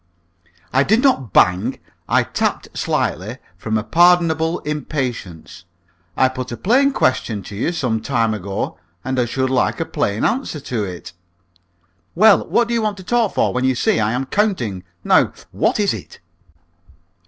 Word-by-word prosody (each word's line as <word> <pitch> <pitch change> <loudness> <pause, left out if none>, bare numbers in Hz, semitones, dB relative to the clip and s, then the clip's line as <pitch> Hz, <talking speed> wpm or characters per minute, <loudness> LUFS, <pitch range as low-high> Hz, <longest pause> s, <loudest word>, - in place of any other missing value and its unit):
"I 135 - +4
did 220 - +2
not 195 - +2
bang. 95 +9 +3 0.3
I - - +3
tapped - - -3
slightly 105 +9 -2 0.2
from 110 0 -2
a 105 - -2
pardonable 165 +3 +3
impatience. 125 - -5 0.5
I 130 - +5
put 130 -1 -6
a 120 - -5
plain 270 +7 +3
question 115 - 0
to 100 - -9
you 115 +11 -1
some 125 -10 -1
time 115 -3 0
ago, 100 -2 -4 0.3
and 130 -1 -1
I 125 - +2
should 130 +2 -1
like 130 - +1
a - - -1
plain 100 +2 -1
answer 250 - -1
to 120 -5 -3
it." 90 -3 -7 1.0
"Well, 210 +3 +5
what 235 - +2
do 235 - -2
you 230 - +1
want 210 -2 -1
to 190 - -10
talk 235 +1 0
for - - +1
when 125 +1 -1
you 130 0 +2
see 115 - +1
I 110 +1 +1
am 130 +2 -1
counting? 130 - -1 0.2
Now, - - +3 0.2
what - - 0
is - - +2
it?" - - -9
130 Hz, 165 wpm, -19 LUFS, 110-175 Hz, 1.0 s, I